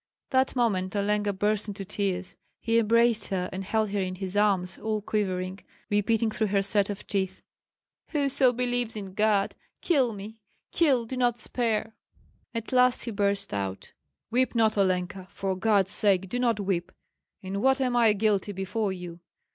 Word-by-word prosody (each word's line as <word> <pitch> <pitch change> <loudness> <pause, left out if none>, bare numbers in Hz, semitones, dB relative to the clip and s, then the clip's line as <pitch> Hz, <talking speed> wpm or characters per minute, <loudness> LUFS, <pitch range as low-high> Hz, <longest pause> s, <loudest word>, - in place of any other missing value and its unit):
That 260 0 +2
moment 200 -6 0
Olenka 205 0 +1
burst 210 +2 0
into 200 -1 -5
tears; 190 -2 -2 0.2
he 230 0 +2
embraced 230 0 +3
her 185 -2 -1
and 190 +1 -4
held 215 +2 0
her 200 0 -1
in 185 -1 -3
his 190 0 -5
arms, 195 -3 +1
all 220 -1 -1
quivering, 190 -3 -2 0.3
repeating 220 +2 +2
through 220 0 0
her 200 0 +1
set 200 0 +2 0.2
teeth, 190 -2 -2 0.6
"Whoso 275 -4 +2
believes 245 -1 -1
in 195 -3 -6
God, 210 -1 +2 0.3
kill 270 -9 +2
me! 210 +2 -9 0.3
kill, 270 -8 +3
do 260 - -5
not 245 -2 +1
spare!" 225 -3 -1 0.6
At 230 -1 -5
last 250 -1 +3
he 235 - -4
burst 200 -1 0
out: 95 -1 -4 0.4
"Weep 255 +1 +1
not, 220 -2 +3
Olenka; 185 -1 0
for 190 +1 -3
God's 200 -1 +2
sake, 190 -3 +2
do 245 - -2
not 235 -4 +1
weep! 185 -3 -1 0.5
In 195 +1 -3
what 265 +2 +3
am 250 -2 0
I 230 -3 +5
guilty 205 -1 +1
before 195 +2 -2
you? 175 -2 -7
210 Hz, 165 wpm, -27 LUFS, 195-230 Hz, 0.6 s, I